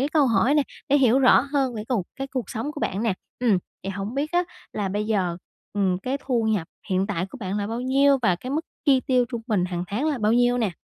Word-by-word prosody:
cái 275 - +1
câu 300 -3 +3
hỏi 235 +5 +3
nè, 295 - +4 0.3
để 285 - +5
hiểu 255 0 +4
rõ 260 - +6
hơn 275 -2 -1
về 215 -1 -5
cuộc 220 -9 0
cái 270 0 -3
cuộc 260 -3 -4
sống 235 +7 -3
của 295 - -7
bạn 195 +4 -1
nè, 225 -5 +1 0.2
ừm, 230 -6 +3 0.2
thì 195 - -3
hổng 200 +5 -5
biết 295 +4 -2
á, 355 +1 +3 0.3
là 205 -2 -2
bây 210 +2 -2
giờ, 185 -6 0 0.4
ừm, 190 -3 +1
cái 255 +7 -2
thu 240 -4 +1
nhập 210 -7 0 0.2
hiện 190 +1 +2
tại 175 +3 -2
của 270 - -11
bạn 195 -2 -3
là 200 - -2
bao 230 +3 -3
nhiêu 275 +2 +4
và 185 -6 +3
cái 250 +9 -7
mức 300 +3 0 0.2
chi 270 -3 +5
tiêu 255 -1 +2
trung 235 -3 -5
bình 205 -6 +1
hàng 180 -1 -3
tháng 220 - -2
là 285 -5 -1
bao 215 +1 +2
nhiêu 245 +1 +3
nè? 220 -5 +1
235 Hz, 265 wpm, -24 LUFS, 200-270 Hz, 0.4 s, rõ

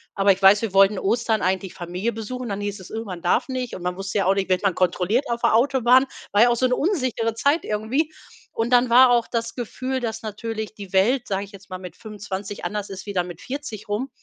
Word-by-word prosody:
Aber 195 0 +4
ich 195 - -11
weiß, 195 +2 +7
wir 215 -4 -3
wollten 195 0 +5
Ostern 220 0 0
eigentlich 190 0 -1
Familie 180 +6 -3
besuchen. 235 +2 -6
Dann 200 0 -3
hieß 205 -1 -4
es: - - -12
„Oh, 225 +1 -4
man 180 -3 -7
darf 175 - +1
nicht“, 255 -2 -4
und 180 - -8
man 180 0 -2
wusste 195 +2 -4
ja 200 - +1
auch 190 - +4
nicht, 195 -1 -1
wird 185 -1 +2
man 195 -3 +2
kontrolliert 185 - +1
auf 235 0 -2
der - - +3
Autobahn, 255 +1 +4 0.3
war 205 - +5
ja 240 - +7
auch 240 - +1
so 255 - +3
'ne 250 - +1
unsichere 255 - 0
Zeit 285 +7 +2
irgendwie. 235 +9 -1 0.4
Und 230 +2 -2
dann 245 0 +5
war 245 +1 +7
auch 240 -1 +3
das 230 0 -3
Gefühl, 255 +2 -3
dass 225 -1 -4
natürlich 220 0 -5
die 200 -3 -10
Welt, 235 +7 +2
sage 195 0 -2
ich 200 - -17
jetzt 200 -1 -14
mal, 185 - -5
mit 180 -1 -10
25 205 -2 -7
anders 205 -1 -3
ist, 195 +1 -8
wie 200 - -5
dann 180 -2 0
mit 175 -1 -9
40 255 -7 -7
rum. 225 +7 -2
215 Hz, 250 wpm, -23 LUFS, 195-245 Hz, 0.4 s, weiß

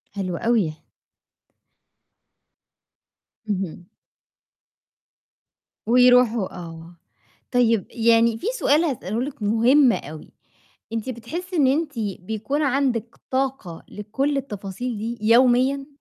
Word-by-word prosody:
حلو 185 -3 -3
أوي. 220 -9 +1 2.8
اهم. 185 -3 -4 2.0
ويروحوا 245 -3 +4
آه، 165 -1 -10 0.6
طيب 230 -5 +2
يعني 230 -1 +3
في 390 - -6
سؤال 305 +4 +3
هاسأله 230 - -2
لِك 265 -5 -6
مُهم 235 +5 +4
أوي، 155 0 -7 0.6
أنتِ 225 +2 -3
بتحسّي 335 - -6
إن 280 -4 +4
أنتِ 295 +3 +1 0.3
بيكون 220 +10 -3
عندِك 250 -4 0
طاقة 260 -10 -2
لكلّ 265 +8 -2
التفاصيل 215 -2 -5
دي 230 +2 -4
يوميًا؟ 260 +3 +3
235 Hz, 90 wpm, -23 LUFS, 205-270 Hz, 2.8 s, ويروحوا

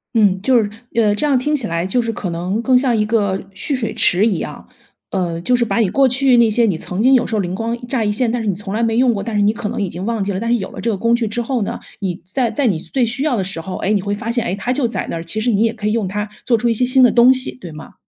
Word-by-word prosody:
嗯， 200 -4 +3
就 250 +5 +3
是 220 -3 +2 0.3
呃， 215 -3 +3
这 210 - -2
样 285 -3 +3
听 295 +4 0
起 260 -6 -1
来 170 +1 -2
就 220 +7 +1
是 230 -1 -2
可 200 -4 -5
能 180 +5 -2
更 260 0 +3
像 250 -3 +1
一 210 - +1
个 205 -3 0
蓄 280 +9 -2
水 225 -4 -3
池 190 +3 +3
一 200 -7 +1
样。 - - -7 0.4
呃， 175 -3 -2
就 250 +8 +2
是 240 -1 +1
把 200 -2 -2
你 215 -5 +2
过 275 +6 +3
去 255 0 +3
那 235 -1 +5
些 230 +2 +3
你 185 -6 0
曾 180 +4 -4
经 260 +3 +5
有 245 - +2
时 - - -6
候 210 - +1
灵 180 -1 -4
光 230 +3 -2
乍 245 -2 -1
一 210 - 0
现， 230 +2 +1
但 240 0 -2
是 220 - -4
你 195 - 0
从 195 +1 -6
来 225 - -1
没 225 0 +1
用 250 0 +4
过， 200 - -3
但 225 -2 -4
是 205 - +2
你 205 +1 +4
可 210 -2 -4
能 235 - -3
已 200 - 0
经 175 +2 -7
忘 225 -2 -1
记 200 - -2
了， 190 - -3
但 230 +2 -2
是 240 - +3
有 190 - -5
了 - - -10
这 230 - -1
个 - - -1
工 230 +4 +2
具 235 -2 -1
之 230 +3 -3
后 245 0 -2
呢， - - -4 0.2
你 180 -3 -4
在 235 +6 -1
在 255 +4 0
你 190 -7 +1
最 255 +9 -2
需 245 +4 0
要 300 -5 +1
的 200 - -1
时 185 -2 -5
候， 185 +3 -6
诶， 205 - -1
你 205 - +1
会 205 0 -2
发 220 +3 -5
现， 235 -1 0
诶， 190 - -1
它 205 +5 -3
就 255 -1 +1
在 230 - -4
那 - - -3
儿， 165 - -5
其 190 +6 -2
实 230 +3 0
你 205 -1 +1
也 230 0 +1
可 215 -2 -4
以 210 - +1
用 225 -4 0
它 205 +3 -3 0.2
做 245 - +3
出 235 +2 0
一 - - +2
些 250 - +1
新 255 +1 +4
的 250 - +6
东 245 +2 +6
西， 255 -1 0
对 175 - -9
吗？ 155 0 -11
225 Hz, 365 characters per minute, -18 LUFS, 195-245 Hz, 0.4 s, 的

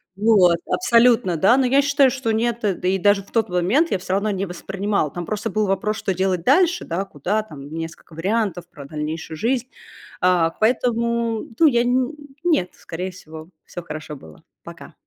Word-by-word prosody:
Вот. 195 -5 +4
Абсолютно, 235 - +3
да. 230 - +4
Но 265 - +3
я 275 +3 +4
считаю, 280 -1 +4
что 245 -3 -2
нет. 235 +1 0
Да 190 -3 -1
и 190 +1 +2
даже 205 +2 +3
в - - -22
тот 225 -4 +1
момент 195 - +1
я 190 - 0
всё 185 0 -4
равно 205 +2 0
не 195 0 -2
воспринимала. 195 -2 -2
Там 175 -1 -6
просто 215 +2 -3
был 215 -1 0
вопрос, 210 +3 -1
что 190 - -2
делать 185 -2 -1
дальше, 350 - +3
да, 180 +4 -3
куда 195 +6 -2
там, 145 -8 -11
несколько 165 0 -8
вариантов 190 0 -1
про 145 -5 -12
дальнейшую 155 +2 -5
жизнь. 245 +5 -1 0.5
А, 180 -2 +3
поэтому, 235 -1 0
ну, 325 - +7
я 240 -3 +3
не 245 - 0
н 260 +3 0 0.3
нет, 305 - +1
скорее 180 +3 -6
всего. 160 -2 -12 0.2
Всё 175 - -8
хорошо 150 -2 -7
было. 80 - -15 0.2
Пока. - - -11
195 Hz, 185 wpm, -21 LUFS, 175-235 Hz, 0.5 s, ну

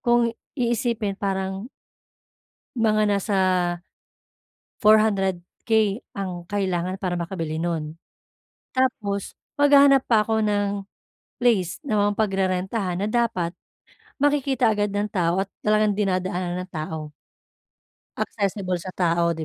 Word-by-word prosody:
kung 240 -2 +3 0.2
iisipin 235 -4 0
parang 190 +2 -2 1.1
mga 215 -2 +3
nasa 200 0 +1 1.4
400k 210 0 +2 0.2
ang 180 -3 -4
kailangan 185 -2 -1
para 180 -2 -1
makabili 165 -3 -3
nun. 160 -2 -3 0.8
Tapos 215 -7 -1 0.2
maghahanap 280 -1 +6
pa 215 -2 +4
ako 220 -1 +1
ng 205 -1 +1 0.7
place 215 -8 +2
na 215 -5 +1
ma-pagrerentahan 190 -2 -1
na - - 0
dapat 225 -8 0 0.7
makikita 275 -5 +2
agad 205 0 0
ng 205 +1 -1
tao 180 0 +1
at 195 - -25
talagang 215 0 +3
dinadaanan 185 -3 -1
ng 185 - -18
tao. 155 -1 -5 1.1
Accessible 195 -3 -2
sa 185 - -8
tao 170 -1 +2
'di 160 - -4
200 Hz, 105 wpm, -24 LUFS, 180-220 Hz, 1.4 s, maghahanap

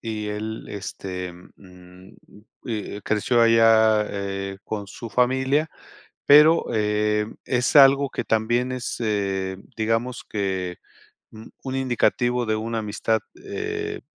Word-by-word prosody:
y 110 -2 -4
él, 110 +1 -5
este, 95 -2 -6 0.2
mm, 90 0 -16 0.6
eh, 105 -3 -4
creció 115 +3 +1
allá, 110 -2 +5
eh, 95 -1 -4
con 105 -2 -5
su 115 +3 -8
familia, 130 +5 +1 0.6
pero, 150 +3 +7
eh, 105 0 +1 0.2
es 125 +1 0
algo 140 -1 +7
que - - -4
también 120 +3 0
es, 125 -1 -4
eh, 95 -4 -1 0.2
digamos 115 +3 -1
que 95 -4 -3 0.5
un 110 0 -12
un 130 -1 -4
indicativo 125 -1 +1
de 110 0 0
una 115 +1 -3
amistad, 110 +1 -1 0.2
eh, - - -4
110 Hz, 120 wpm, -23 LUFS, 100-120 Hz, 0.6 s, pero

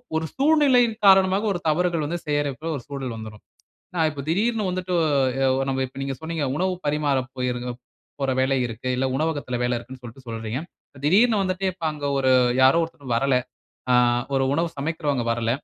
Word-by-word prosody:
ஒரு 160 0 0
சூழ்நிலையின் 270 -6 +4
காரணமாக, 190 +1 +5
ஒரு 175 - -3
தவறுகள் 170 0 +1
வந்து 175 +3 -3
செய்றப்போல 145 +1 -1
ஒரு 125 - -10
சூழல் 135 -4 -5
வந்துரும். 110 -1 -9 0.6
அ 160 - +3
இப்ப 140 -2 -7
திடீர்னு 215 +3 +1
வந்துட்டு, 180 0 -3 0.6
ஒ - - -1
அ - - -4
நம்ம 135 0 0
இப்ப 135 +2 -11
நீங்க 135 0 -3
சொன்னீங்க, 160 -2 -2
உணவு 185 +2 0
பரிமாற 145 -2 +1 0.2
போயிருக்கிறப் 125 -1 -3 0.4
போற 135 -1 +1
வேல 130 +1 +2
இருக்கு. 120 +2 -6
இல்ல 135 - +1
உணவகத்தில 145 -5 -2
வேல 125 0 +1
இருக்குன்னு 125 +2 -10
சொல்லிட்டு 125 +2 -11
சொல்றீங்க. 115 +1 -4 0.5
திடீர்னு 215 +7 +4
வந்துட்டு 185 +1 -2
இப்ப 175 -2 -14
அங்க 150 -1 -6
ஒரு 130 -1 +3 0.3
யாரோ 135 +5 +6
ஒருத்தர் 140 -6 -6
வரல. 135 +1 +2 0.6
ஆ - - +5 0.4
ஒரு 135 0 +2
உணவு 165 +3 0
சமைக்கிறவங்க 145 -4 -1
வரல. 115 -1 -1
145 Hz, 175 wpm, -24 LUFS, 130-180 Hz, 0.6 s, யாரோ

